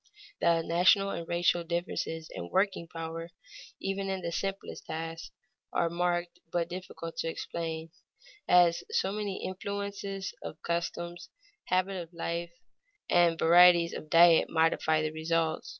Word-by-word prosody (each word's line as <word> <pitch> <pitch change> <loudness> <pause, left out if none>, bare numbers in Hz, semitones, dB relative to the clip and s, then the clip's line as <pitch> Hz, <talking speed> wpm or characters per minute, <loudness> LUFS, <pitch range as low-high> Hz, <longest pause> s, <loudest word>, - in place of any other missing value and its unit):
The 165 -1 +3
national 185 +4 +4
and 170 -1 -5
racial 175 0 +2
differences 165 -1 -3
in 85 - -6
working 190 -3 +1
power, 165 0 -6 0.5
even 195 0 -2
in 190 -1 -2
the 170 -1 -3
simplest 195 +3 -4
tasks, 165 +1 -5 0.4
are 170 -1 +1
marked 175 0 -1
but 170 -1 0
difficult 175 -2 -7
to - - -2
explain, 165 0 -4 0.6
as 175 -1 +5
so 440 - 0
many 205 -2 -4
influences 200 0 -4
of 155 - -7
customs, 170 0 -3 0.4
habits 185 -2 -1
of - - -21
life, 170 +1 -3 0.6
and 170 -1 +4
varieties 170 0 +6
of 155 - -7
diet 170 0 +6
modify 160 -1 +2
the 155 - -1
result. 160 0 -1
170 Hz, 135 wpm, -30 LUFS, 165-185 Hz, 0.6 s, varieties